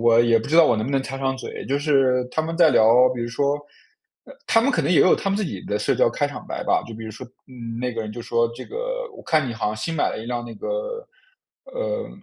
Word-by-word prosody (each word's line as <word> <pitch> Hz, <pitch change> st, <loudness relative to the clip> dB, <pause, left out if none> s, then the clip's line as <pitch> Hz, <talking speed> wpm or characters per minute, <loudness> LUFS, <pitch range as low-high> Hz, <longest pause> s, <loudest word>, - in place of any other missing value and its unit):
我 115 Hz, -1 st, +5 dB
也 120 Hz, -1 st, +4 dB
不 110 Hz, -, -7 dB
知 160 Hz, -, +2 dB
道 170 Hz, -, +8 dB
我 120 Hz, -, +3 dB
能 110 Hz, -, -1 dB
不 -, -, -3 dB
能 135 Hz, -1 st, +1 dB
插 135 Hz, 0 st, -6 dB
上 135 Hz, 0 st, -1 dB
嘴。 130 Hz, -, -7 dB
就 140 Hz, +1 st, 0 dB
是 135 Hz, -4 st, +2 dB
他 160 Hz, -, 0 dB
们 165 Hz, +1 st, -4 dB
在 165 Hz, -3 st, +6 dB
聊 120 Hz, +1 st, +6 dB
比 120 Hz, -, -5 dB
如 120 Hz, -, -3 dB
说 140 Hz, +4 st, 0 dB, 0.7 s
呃， -, -, -13 dB
他 225 Hz, -, +4 dB
们 255 Hz, +5 st, +2 dB
可 165 Hz, -, +1 dB
能 145 Hz, -, 0 dB
也 180 Hz, -, +5 dB
有 185 Hz, -, +6 dB
他 195 Hz, -, -3 dB
们 195 Hz, -, +1 dB
自 210 Hz, -, -1 dB
己 100 Hz, -, -5 dB
的 105 Hz, -, -2 dB
社 -, -, +1 dB
交 -, -, +3 dB
开 -, -, 0 dB
场 -, -, -8 dB
白 -, -, -4 dB
吧。 -, -, +2 dB
就 115 Hz, -, -8 dB
比 110 Hz, +1 st, -8 dB
如 110 Hz, -, -6 dB
说， 110 Hz, +4 st, -9 dB, 0.2 s
嗯， 115 Hz, -3 st, -8 dB
那 125 Hz, 0 st, -2 dB
个 115 Hz, -, -3 dB
人 105 Hz, -, -6 dB
就 120 Hz, -, -7 dB
说， 115 Hz, 0 st, +1 dB
这 130 Hz, -, -8 dB
个 -, -, -4 dB
“我 -, -, -11 dB
看 155 Hz, -5 st, +1 dB
你 120 Hz, -, -4 dB
好 115 Hz, -, -2 dB
像 105 Hz, +1 st, -2 dB
新 135 Hz, +10 st, -3 dB
买 155 Hz, -, +1 dB
了 -, -, -5 dB
一 115 Hz, -, -8 dB
辆 120 Hz, 0 st, -3 dB
那 115 Hz, -1 st, -9 dB
个 -, -, -7 dB, 1.0 s
呃， -, -, -3 dB
130 Hz, 315 characters per minute, -23 LUFS, 115-165 Hz, 1.0 s, 道